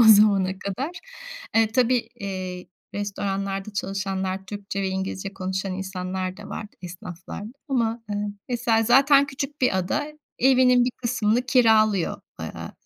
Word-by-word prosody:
o - - +9
zamana 200 -3 +6
kadar. 200 - -3 0.7
Iıı, 225 -1 +5
tabii, 245 -1 +2
iii, 185 -2 -5 0.3
restoranlarda 200 0 -2
çalışanlar 195 -1 -2
Türkçe 200 0 -4
ve 190 - 0
İngilizce 190 +1 -3
konuşan 190 0 -2
insanlar 185 0 -3
da 205 - -10
vardı, 210 - -7
esnaflarda 180 +4 -8 0.2
ama, 235 -3 0
ııı, 205 0 -1 0.2
mesela 235 -2 +2
zaten 275 +4 +6
küçük 280 +1 -5
bir 250 -7 +3
ada 290 +11 -1 0.3
evinin 250 -1 +5
bir 250 - +1
kısmını 235 -1 +1
kiralıyor, 220 -7 +4 0.2
ııı, - - -6
205 Hz, 130 wpm, -25 LUFS, 190-240 Hz, 0.7 s, o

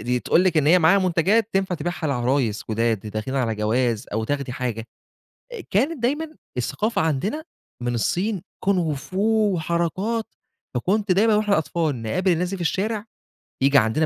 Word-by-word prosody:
دي 125 0 -1
تقول 180 - +3
لِك 180 -3 +2
إن 150 -2 +3
هي 180 +3 +6
معاها 170 +4 +5
منتجات 190 +5 +2
تنفع 190 -1 0
تبيعها 175 -1 -3
لعرايس 125 -4 0
جُداد 115 -1 +1
د - - -11
داخلين 110 +5 -4
على 115 -4 0
جواز 110 +1 0
أو 110 +1 -1
تاخدي 140 0 -2
حاجة، 120 -3 -3 0.8
كانت 265 - +1
دايمًا 305 +6 -1 0.2
الثقافة 210 - -1
عندنا 185 - -1 0.4
من 120 0 -1
الصين 185 - -1 0.2
كونغو 180 -6 +1
فو 205 +8 +1
وحركات، 170 +7 -1 0.5
فكنت 195 - +1
دايمًا 215 +4 +4
وإحنا 210 -3 +2
أطفال 155 -6 -1
نقابل 180 - +1
الناس 175 +2 0
دي 195 - -3
في 180 - -5
الشارع 205 +5 -1 0.6
ييجي 140 +1 +5
عندنا 125 +6 +3
170 Hz, 160 wpm, -23 LUFS, 125-200 Hz, 0.8 s, هي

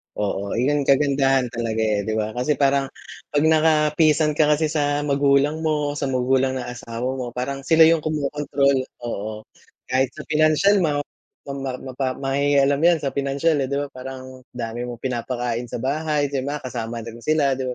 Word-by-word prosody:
Oo, 100 -1 -2
yun 140 +4 +1
kagandahan 135 -2 +3
talaga, 115 -2 -2
eh, 105 -2 0
'di 110 - -1
ba? 110 0 -1
Kasi 125 +6 0
parang 140 0 +2 0.5
'pag 145 - +3
nakapisan 155 -1 +3
ka 155 - +5
kasi 155 +1 0
sa 145 -1 0
magulang 140 +1 +2
mo 155 -2 0
o 145 - -5
sa 140 - -1
magulang 130 0 +1
ng 125 -2 -4
asawa 125 +2 -4
mo, 120 -2 -5
parang 135 +2 -4
sila 160 0 +6
yung 165 +1 +6
kumokontrol, 145 -2 0 0.2
oo. 110 -2 -5 0.5
Kahit 130 0 +1
sa - - -8
financial 155 +6 +4
ma 150 -5 +1 0.5
ma - - -2 0.3
ma 130 - -7
ma 130 -2 0
mangingialam 140 +1 +2
'yan 170 -1 +5
sa 140 - -1
financial, 140 +3 0
eh. 135 - 0
'Di 140 - -3
ba, 140 0 -2
parang 130 0 -9 0.2
dami 120 0 -4
mong 120 -1 -8
pinapakain 120 -1 -2
sa 115 0 -6
bahay, 145 +1 0
'di 135 -2 -2
ba, 145 +1 -4
kasama 120 -2 -5
din 115 +1 -9
sila. 140 0 +1
'Di 130 - -3
135 Hz, 180 wpm, -22 LUFS, 125-150 Hz, 0.5 s, sila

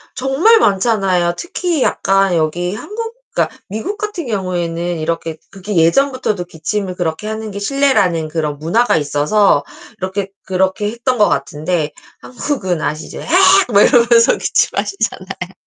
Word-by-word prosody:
정말 280 - +4
많잖아요. 195 - +2
특히 350 -4 -2
약간 195 -2 +2
여기 170 +3 -1
한국 455 - -6 0.2
그러니까 - - 0
미국 220 - -4
같은 400 -7 -4
경우에는 175 -4 -2
이렇게 165 0 -3
그게 195 +1 -6
예전부터도 210 +2 +2
기침을 180 +4 -3
그렇게 170 +2 -3
하는 220 0 -4
게 200 - -7
실례라는 205 - +1
그런 150 -2 -3
문화가 190 +11 +2
있어서 150 +3 +2 0.3
이렇게 190 +1 -3 0.2
그렇게 190 +3 0
했던 240 +2 -1
것 210 - +4
같은데 150 +3 -1 0.3
한국은 240 - -3
아시죠? 155 +1 -4
헤엑 - - -9 0.4
막 200 - +6
이러면서 235 -2 +5
기침하시잖아요. 395 - -2
195 Hz, 340 characters per minute, -16 LUFS, 170-240 Hz, 0.4 s, 막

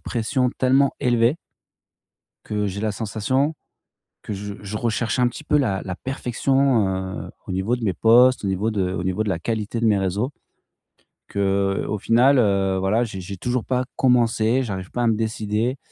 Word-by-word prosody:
pression 125 +2 -1
tellement 135 +2 +3
élevé 120 +1 +2 1.1
que 105 -1 -2
j'ai 100 +1 -4
la 110 -1 0
sensation 115 +8 -1 0.7
que 105 - -5
je 100 +1 -6
je 105 +1 -5
recherche 115 +1 -1
un 125 - +4
petit 155 - -10
peu 150 - +3
la 100 -9 0
la 95 -2 -5
perfection. 130 -2 +1 0.4
Heu, - - -10 0.2
au - - -4
niveau 95 +6 0
de 120 - -7
mes 95 -4 +1
posts, 120 +5 +5
au - - 0
niveau 95 +4 0
de 95 -4 -1
au 90 - -3
niveau 95 +4 -1
de 105 - -2
la 90 - -1
qualité 110 +3 -3
de 115 - 0
mes 105 - +3
réseaux, 100 +8 -1 1.0
qu'au 100 +1 0
final, 125 +7 +4
heu, 100 -3 +2
voilà, 105 +5 +1
j'ai 95 -5 -5
j'ai 95 +1 -7
toujours 125 +3 -2
pas 125 0 0
commencé, 120 -1 +2
j'arrive 95 -5 -5
pas 120 - -1
à 120 - +2
me 110 - +3
décider. 110 +3 -1
110 Hz, 180 wpm, -22 LUFS, 100-125 Hz, 1.1 s, posts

